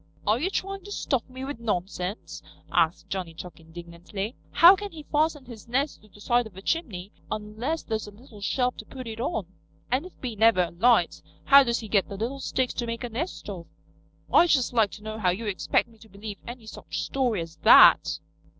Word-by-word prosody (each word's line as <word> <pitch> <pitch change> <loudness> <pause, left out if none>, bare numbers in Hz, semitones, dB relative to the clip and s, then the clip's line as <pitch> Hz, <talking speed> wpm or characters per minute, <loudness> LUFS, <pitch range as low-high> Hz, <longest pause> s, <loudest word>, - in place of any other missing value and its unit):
"Are 215 +3 +2
you 340 +7 0
trying 390 0 -3
to 410 - -9
stuff 265 - 0
me 260 +1 -7
with 280 -3 -6
nonsense?" 190 -2 -3 0.3
asked 165 +1 +1
Johnny 180 -4 -4
Chuck 175 +1 -10
indignantly. 170 +6 -7
"How 350 +3 +8
can 410 +1 -7
he 310 -2 -10
fasten 300 -2 0
his 235 -2 -11
nest 270 +5 -1
to 215 - -19
the 205 - -19
side 240 +2 +1
of 190 -4 -17
a - - -8
chimney 210 - -2 0.2
unless 220 +9 -3
there's 220 -2 -3
a - - -9
little 210 0 -15
shelf 250 +4 0
to - - -8
put 260 -2 -8
it 225 0 -7
on? 235 - -2 0.5
And 270 +8 0
if 370 - -17
he 245 -4 -5
never 220 -3 +4
alights, 195 +8 +2 0.2
how 280 0 +8
does 235 -2 -1
he 220 - -7
get 200 -2 +1
the 200 - -6
little 245 +6 -3
sticks 260 -1 -1
to 240 - -3
make 230 +1 -4
a 245 - -3
nest 280 +11 -5
of? 180 -5 -7 0.7
I'd 345 - +6
just 260 -5 +2
like 225 -4 +3
to 210 - -11
know 215 0 -6
how 185 -4 +2
you 195 +6 -2
expect 205 +3 0
me 225 -1 -21
to 220 +1 -17
believe 205 +1 -8
any 240 -1 -8
such 215 - -6
story 250 -7 0
as 165 -1 -9
that." - - +7
225 Hz, 215 wpm, -26 LUFS, 200-260 Hz, 0.7 s, How